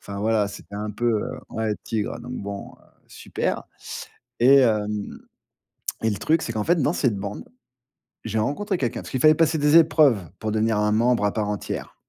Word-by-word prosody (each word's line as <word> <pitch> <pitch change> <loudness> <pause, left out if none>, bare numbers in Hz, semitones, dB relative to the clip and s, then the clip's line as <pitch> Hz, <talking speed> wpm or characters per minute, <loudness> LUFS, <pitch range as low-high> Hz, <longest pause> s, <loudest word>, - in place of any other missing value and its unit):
Enfin 100 0 -7
voilà, 110 -2 +2
c'était 100 - -11
un 105 +1 -3
peu, 120 +3 0
heu, 130 +1 -5
ouais, 110 -1 -1
tigre, 110 0 -3
donc 125 +1 -8
bon, 100 -2 -6
heu, - - -25 0.2
super, - - -3 0.8
et 135 +3 +7
hem, 105 -3 0 0.8
et 110 - +2
le 100 - -3
truc, 160 +1 +1
c'est 115 - -3
qu'en 110 -1 -2
fait, 175 - +3
dans 145 - +2
cette 125 - +1
bande, 100 +1 -5 0.8
j'ai 110 0 -1
rencontré 175 - -1
quelqu'un, 120 -4 -2
parce - - -10
qu'il 130 - -1
fallait 155 +3 +6
passer 160 0 +2
des 150 +3 +5
épreuves 155 -7 +5 0.2
pour 110 -1 -2
devenir 110 0 +1
un 105 0 +2
membre 115 0 +2
à 105 - +2
part 105 -2 -1
entière. 105 - -5
110 Hz, 195 wpm, -24 LUFS, 105-135 Hz, 0.8 s, et